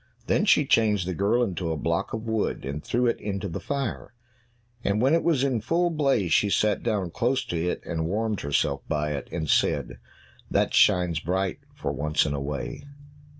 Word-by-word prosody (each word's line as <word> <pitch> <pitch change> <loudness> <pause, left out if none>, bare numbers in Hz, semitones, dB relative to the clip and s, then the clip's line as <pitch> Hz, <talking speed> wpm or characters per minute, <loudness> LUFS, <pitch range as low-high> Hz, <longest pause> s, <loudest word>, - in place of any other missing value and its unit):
Then - - +2
she - - +5
changed 105 -5 +2
the 95 - -1
girl 105 +8 +2
into 90 -6 -2
a 80 - -2
block - - -1
of 110 0 -4
wood, 110 - -1
and 70 +3 -4
threw 125 +1 0
it 120 - 0
into 100 -1 -3
the 85 - -5
fire. 140 -3 -4 0.7
And 100 +1 +1
when 130 +6 +3
it 165 - +4
was 155 -6 +2
in 130 -5 0
full 170 +9 +1
blaze 135 - +1
she 105 - +3
sat 105 +1 +2
down 105 -7 -1
close 125 +7 0
to 85 +1 -1
it, - - -4
and 80 -2 -2
warmed 105 +2 -1
herself 70 0 0
by 75 -1 0
it, 70 -2 -4
and 80 -2 -3
said, - - +1 0.5
"That - - +1
shines 90 -3 +4
bright 95 +3 -1 0.2
for - - -3
once 75 +1 +1
in 75 - -1
a 70 - -3
way." 70 - -5
100 Hz, 195 wpm, -26 LUFS, 80-120 Hz, 0.7 s, she